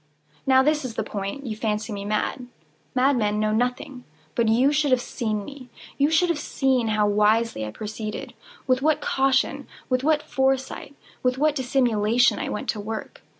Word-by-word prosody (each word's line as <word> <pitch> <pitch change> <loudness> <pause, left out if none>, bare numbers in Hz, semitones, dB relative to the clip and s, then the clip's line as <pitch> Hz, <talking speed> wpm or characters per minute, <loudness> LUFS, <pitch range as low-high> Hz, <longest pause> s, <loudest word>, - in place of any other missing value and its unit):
Now 260 0 +6
this 300 +1 +1
is 245 -4 -5
the - - -1
point. 200 +7 -5
You 220 -3 -3
fancy 215 0 -2
me 200 0 -5
mad. 215 +4 -2 0.5
Madmen 245 -6 +2
know 215 0 +1
nothing. 250 +2 -2 0.3
But 230 +5 +1
you 250 +5 +4
should 295 -1 +1
have 255 -1 +4
seen 215 -4 -3
me. 275 -3 -11 0.3
You 285 +1 +4
should 325 +3 +3
have 335 -3 0
seen 265 -5 0
how 215 -1 +2
wisely 210 - +2
I - - -5
proceeded—with 215 - -4
what 305 +1 +2
caution—with 265 -1 0
what 300 0 +2
foresight—with 265 -1 -2
what 305 +2 +2
dissimulation 245 -3 +2
I - - -3
went 210 - -4
to 215 - -1
work! 215 +1 -6
250 Hz, 160 wpm, -24 LUFS, 215-270 Hz, 0.5 s, Now